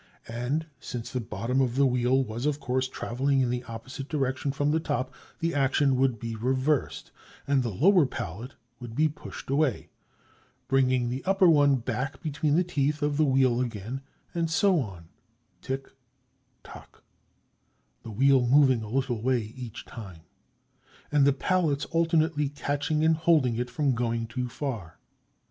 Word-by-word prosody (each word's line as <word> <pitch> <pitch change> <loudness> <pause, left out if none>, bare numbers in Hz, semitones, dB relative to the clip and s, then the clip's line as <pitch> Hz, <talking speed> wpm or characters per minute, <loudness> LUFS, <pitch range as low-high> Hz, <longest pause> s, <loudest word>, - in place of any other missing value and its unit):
And 125 +7 -2
since 120 -2 -6
the 130 - -2
bottom 115 +3 -1
of 125 -2 0
the 140 +1 +4
wheel 125 +1 +2
was, 120 +3 -3
of 150 -1 0
course, 130 0 -1
traveling 135 +2 0
in 125 -2 +1
the 125 0 -2
opposite 130 +5 -8
direction 135 -2 -1
from 145 +1 0
the 160 - +2
top, 130 -3 -2 0.3
the 165 +1 -1
action 140 0 +2
would 130 -2 +2
be 115 0 -4
reversed, 130 +5 -1 0.3
and 140 -1 +2
the 120 - -2
lower 165 - +4
pallet 115 +2 -6 0.2
would 120 -2 -8
be 155 +3 +3
pushed 150 -2 -8
away, 140 -4 0 0.8
bringing 130 -2 +2
the 130 +2 -4
upper 195 -1 +4
one 145 -4 +5
back 135 +3 -3
between 150 -2 0
the 180 - +4
teeth 150 -3 -1
of 145 -1 0
the 155 - +4
wheel 130 -3 +3
again; 120 +2 -4 0.3
and 170 -2 -1
so 175 +3 +3
on, 95 - -6 0.5
"tick 135 +1 -4 0.8
tock," - - -14 1.0
the - - -9
wheel 130 +3 +3
moving 130 -2 +5
a 110 - -7
little 125 -2 -1
way 120 -3 0
each 120 -3 -8
time, 95 -8 -10 0.9
and 145 -2 +4
the - - +6
pallets 155 -1 0
alternately 165 -3 +2
catching 145 +2 -1
and 160 0 +4
holding 155 -7 +3
it 125 +2 -2
from 135 +2 +1
going 115 -1 -1
too 125 +2 -4
far. 115 - -5
135 Hz, 160 wpm, -27 LUFS, 120-145 Hz, 1.0 s, the